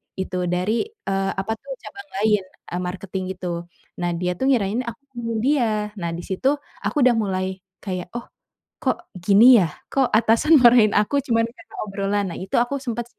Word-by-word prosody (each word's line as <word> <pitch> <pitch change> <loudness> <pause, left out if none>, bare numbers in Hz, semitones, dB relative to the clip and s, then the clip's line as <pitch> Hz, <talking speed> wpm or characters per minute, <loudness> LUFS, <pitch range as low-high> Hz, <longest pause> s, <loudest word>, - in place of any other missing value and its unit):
iitu, 190 -1 -3
dari, 185 - 0
eee, 195 - -2
apa 195 +3 -2
itu, 280 - -29 0.2
cabang 400 -6 -10 0.2
lain, 210 -3 +3 0.3
eee, 175 - -2
marketing 190 +1 -5
gitu. 170 -1 -5 0.3
Nah, 175 -1 -1
dia 180 +1 -1
tuh 265 - +1
ngirain 225 -3 +2
aku 230 +2 -6
ngomongin 230 -2 -3
dia. 270 -4 +3 0.3
Nah, 170 -1 -3
di 175 - -6
situ 265 +10 +1 0.3
aku 290 -4 +1
udah 250 -2 +5
mulai 190 -2 -2 0.2
kayak, 185 -3 -4
"Oh, 240 - -3 0.6
kok 345 0 -1 0.2
gini 230 +5 +8
ya? 185 - +4 0.2
Kok 270 -2 +2
atasan 230 +8 +4
marahin 235 -4 +7
aku 210 +7 +2
cuman 230 -2 +2
karna 230 - -15
obrolan?" 200 0 -1
Nah, - - -7
itu 190 - -4
aku 245 +4 -1
sempat 240 0 -3
210 Hz, 175 wpm, -22 LUFS, 190-240 Hz, 0.6 s, gini